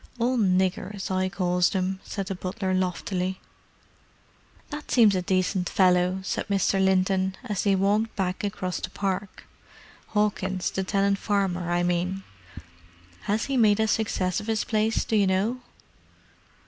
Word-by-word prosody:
"All 245 +2 +1
niggers, 190 -1 0
I 185 0 +1
calls 180 -2 +1
them," 190 0 -1
said 195 - -4
the 195 - -3
butler 185 +1 -3
loftily. 185 0 -1 1.3
"That 295 +1 -7
seems 225 -5 +5
a 185 - 0
decent 185 0 0
fellow," 180 0 +3
said - - -3
Mr. 195 -1 +2
Linton, 190 0 +2
as 210 -6 -2
they 200 -1 +4
walked 205 +4 +1
back 185 -1 -2
across 190 -2 -3
the - - -5
park. 195 0 -3 0.6
"Hawkins, 195 -3 0
the 190 - -2
tenant 200 0 +1
farmer, 190 -4 -1
I 175 0 +1
mean. 180 +2 -1 1.1
Has 210 +2 +1
he 275 -1 -1
made 215 -3 +4
a 220 - +2
success 190 -5 0
of 210 - -9
his 220 -2 0
place, 220 -1 0
do 225 - -1
you 200 -2 +4
know?" 200 +7 0
190 Hz, 150 wpm, -26 LUFS, 185-210 Hz, 1.3 s, seems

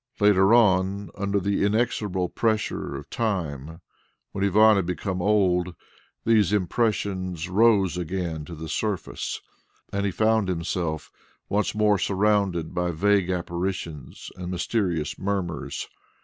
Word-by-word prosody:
Later 100 -1 +5
on, 100 -4 +3
under 100 0 -1
the 100 +1 0
inexorable 100 -3 0
pressure 110 -2 -1
of - - -7
time 80 - -3 0.5
when 95 - -3
Ivan 105 +2 +5
had 95 -3 0
become 90 0 -3
old, 90 -3 +2 0.5
these 110 -5 +4
impressions 95 -4 -1
rose 100 -2 +3
again 85 -2 -3
to 85 - -8
the 80 +1 -7
surface, 100 +2 -3 0.5
and 100 0 0
he 100 - 0
found 110 +1 +2
himself 85 -3 -2 0.4
once 105 0 0
more 105 -2 +3
surrounded 100 -5 +1
by 90 0 0
vague 95 +2 +2
apparitions 85 -4 -4
and 90 -1 -6
mysterious 85 - -1
murmurs. 95 -7 -3
95 Hz, 120 wpm, -25 LUFS, 90-105 Hz, 0.5 s, Later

